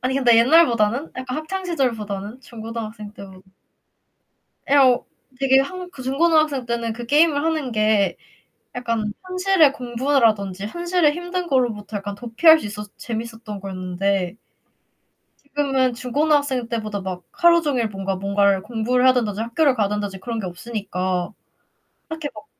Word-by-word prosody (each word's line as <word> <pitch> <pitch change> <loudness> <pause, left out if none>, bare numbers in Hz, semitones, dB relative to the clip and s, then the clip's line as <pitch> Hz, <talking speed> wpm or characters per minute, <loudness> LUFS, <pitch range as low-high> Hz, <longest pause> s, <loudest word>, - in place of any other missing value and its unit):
아니 255 +1 -1
근데 245 -4 +4
옛날보다는? 245 -1 +3
약간 255 +1 -4
학창 375 +5 -5
시절보다는? 225 - -3
중고등학생 225 -3 -7
때보다 190 -2 -12 1.3
예 280 - +3
어, 255 -3 +5 0.3
되게 270 0 +4
한 360 +6 -4
그 265 - -10
중고등학생 295 0 +2
때는 235 -1 -2
그 240 +1 -7
게임을 295 +2 +3
하는 315 -5 -1
게 215 -2 +2 0.6
약간 230 -4 -2
현실의 365 -4 +3
공부라든지 230 -6 0
현실의 345 +1 +1
힘든 350 +2 -4
걸로부터 225 - -1
약간 200 0 -5
도피할 245 +9 +5
수 - - -7
있어서 210 0 -6
재밌었던 225 -2 -6
거였는데 185 0 -2 1.1
지금은 275 -3 0
중고등학생 265 0 0
때보다 215 -4 -3
막 185 -2 -6
하루 340 0 +4
종일 260 -7 0
뭔가 195 -1 -3
뭔가를 200 0 +2
공부를 240 +3 0
해야 255 - +7
된다든지 220 -4 -1
학교를 260 +4 +2
가야 210 -4 +1
된다든지 205 -2 -3
그런 230 +3 -4
게 200 - -4
없으니까 185 -1 -3 0.8
딱히 320 -2 -4
막 210 - -11
235 Hz, 350 characters per minute, -22 LUFS, 210-285 Hz, 1.3 s, 해야